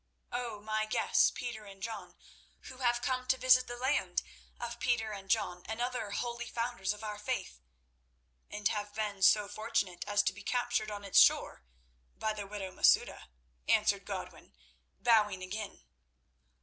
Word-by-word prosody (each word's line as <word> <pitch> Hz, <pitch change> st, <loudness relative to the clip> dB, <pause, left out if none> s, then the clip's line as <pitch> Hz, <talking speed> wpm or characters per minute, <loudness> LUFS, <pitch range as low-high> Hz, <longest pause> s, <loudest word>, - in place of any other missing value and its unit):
"O, 240 Hz, -3 st, -3 dB
my 215 Hz, 0 st, -1 dB
guests, -, -, +3 dB
Peter 235 Hz, -3 st, -6 dB
and 195 Hz, -1 st, -12 dB
John, 225 Hz, 0 st, -6 dB, 0.5 s
who 260 Hz, -, -10 dB
have 240 Hz, -2 st, +1 dB
come 255 Hz, -1 st, -1 dB
to 260 Hz, -, +3 dB
visit 255 Hz, 0 st, +5 dB
the 240 Hz, -, -6 dB
land 260 Hz, +4 st, 0 dB, 0.4 s
of 235 Hz, 0 st, -5 dB
Peter 220 Hz, -3 st, 0 dB
and 195 Hz, -2 st, -8 dB
John 180 Hz, -1 st, +1 dB
and 220 Hz, +1 st, -4 dB
other 245 Hz, -3 st, -2 dB
holy 240 Hz, +3 st, -3 dB
founders 230 Hz, -5 st, -2 dB
of 210 Hz, +1 st, -7 dB
our 210 Hz, -1 st, -5 dB
faith—" 210 Hz, -, -3 dB, 0.9 s
"And 210 Hz, 0 st, 0 dB
have 205 Hz, -1 st, -4 dB
been 210 Hz, -3 st, -3 dB
so 205 Hz, +2 st, +6 dB
fortunate 205 Hz, -4 st, -2 dB
as 205 Hz, 0 st, +3 dB
to -, -, +1 dB
be 205 Hz, -, -11 dB
captured 220 Hz, -1 st, 0 dB
on 205 Hz, -1 st, -6 dB
its 195 Hz, -, +5 dB
shore -, -, +4 dB, 0.6 s
by 215 Hz, 0 st, -1 dB
the 205 Hz, -2 st, -6 dB
widow 195 Hz, -2 st, -5 dB
Masouda," -, -, +3 dB, 0.4 s
answered -, -, +3 dB
Godwin, -, -, -7 dB, 0.4 s
bowing 210 Hz, -5 st, +3 dB
again. 205 Hz, +3 st, -6 dB
215 Hz, 160 wpm, -32 LUFS, 205-240 Hz, 0.9 s, so